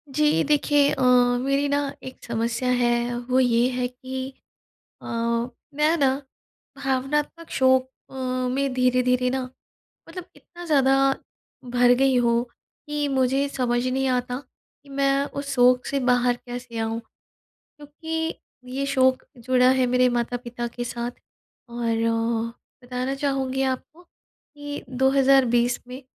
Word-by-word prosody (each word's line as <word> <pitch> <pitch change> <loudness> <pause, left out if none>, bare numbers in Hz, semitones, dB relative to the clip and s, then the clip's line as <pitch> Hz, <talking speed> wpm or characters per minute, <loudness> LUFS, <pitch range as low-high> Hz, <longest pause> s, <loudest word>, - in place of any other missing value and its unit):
जी 300 0 +3
देखिए 290 -1 +3
अ, - - -1 0.4
मेरी 275 +2 +1
ना 285 0 +2 0.2
1 260 - -10
समस्या 235 +2 -1
है 240 0 +1
वो 255 - +3
ये 245 -1 +3
है 250 0 -1
कि 260 +1 -6 0.7
अ, - - -10 0.7
मैं 305 +3 +2
ना 270 -3 +3 0.6
भावनात्मक 290 +5 -2
शोक 260 0 +3 0.2
अ, - - -14 0.4
में 275 +1 -1
धीरे-धीरे 250 0 +2
ना 260 0 -1 0.7
मतलब 350 +1 -8
इतना 350 0 -12
ज़्यादा 270 -4 +3 0.8
भर 245 0 +5
गई 270 -1 +3
हूँ 235 -1 +2 0.4
कि 295 -1 -1
मुझे 270 +1 +1
समझ 245 -2 -1
नहीं 265 +1 0
आता 250 0 -1 0.5
कि 285 - -19
मैं 275 0 +1
उस 280 -1 -5
शोक 250 0 +4
से 280 - -1
बाहर 245 0 +3
कैसे 245 -1 -7
आऊँ। 225 0 -2 0.6
क्योंकि 320 +2 -5 0.4
ये 275 +1 -1
शोक 260 -1 +2
जुड़ा 250 +1 +3
है 260 -1 +2
मेरे 250 +1 +3
माता-पिता 240 0 -3
के 240 +1 -6
साथ 240 0 -4 0.6
और 235 -1 -1 0.9
बताना 250 +2 -3
चाहूँगी 270 -1 -1
आपको 265 +6 -3
कि 290 -4 -11
2020 265 -2 +3
में 255 +2 -8
260 Hz, 130 wpm, -24 LUFS, 245-275 Hz, 0.9 s, भर